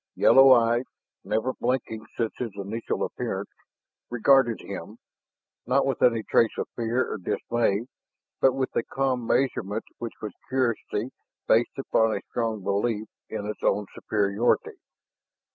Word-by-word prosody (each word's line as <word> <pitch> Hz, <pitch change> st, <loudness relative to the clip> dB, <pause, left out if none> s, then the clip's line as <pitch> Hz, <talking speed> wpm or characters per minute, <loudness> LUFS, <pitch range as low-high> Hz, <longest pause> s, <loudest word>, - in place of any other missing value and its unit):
Yellow 135 Hz, 0 st, +7 dB
eyes, 120 Hz, 0 st, +4 dB, 0.4 s
never 110 Hz, +6 st, -1 dB
blinking 120 Hz, -3 st, -2 dB
since 115 Hz, -2 st, -1 dB
his 125 Hz, -, -2 dB
initial 100 Hz, +3 st, -3 dB
appearance, -, -, -4 dB, 0.6 s
regarded 120 Hz, 0 st, +4 dB
him, -, -, -8 dB, 0.7 s
not 135 Hz, +2 st, +3 dB
with 135 Hz, -3 st, -1 dB
any 115 Hz, -3 st, +4 dB
trace 115 Hz, +1 st, +2 dB
of -, -, -2 dB
fear 120 Hz, +2 st, 0 dB
or -, -, -4 dB
dismay, 115 Hz, +2 st, 0 dB, 0.5 s
but 135 Hz, -, +4 dB
with 130 Hz, 0 st, -2 dB
a -, -, +3 dB
calm 130 Hz, -2 st, -1 dB
measurement 110 Hz, -6 st, 0 dB, 0.2 s
which 115 Hz, -2 st, -5 dB
was 105 Hz, -3 st, -6 dB, 0.2 s
curiosity 125 Hz, -2 st, -1 dB, 0.4 s
based 115 Hz, +2 st, +3 dB
upon 110 Hz, -4 st, +2 dB
a 100 Hz, -, -3 dB
strong 110 Hz, -4 st, -2 dB
belief 105 Hz, +2 st, -1 dB, 0.2 s
in 105 Hz, -2 st, -4 dB
its 105 Hz, -, -5 dB
own 105 Hz, +1 st, +1 dB
superiority. 110 Hz, -, 0 dB
115 Hz, 135 wpm, -26 LUFS, 110-130 Hz, 0.7 s, Yellow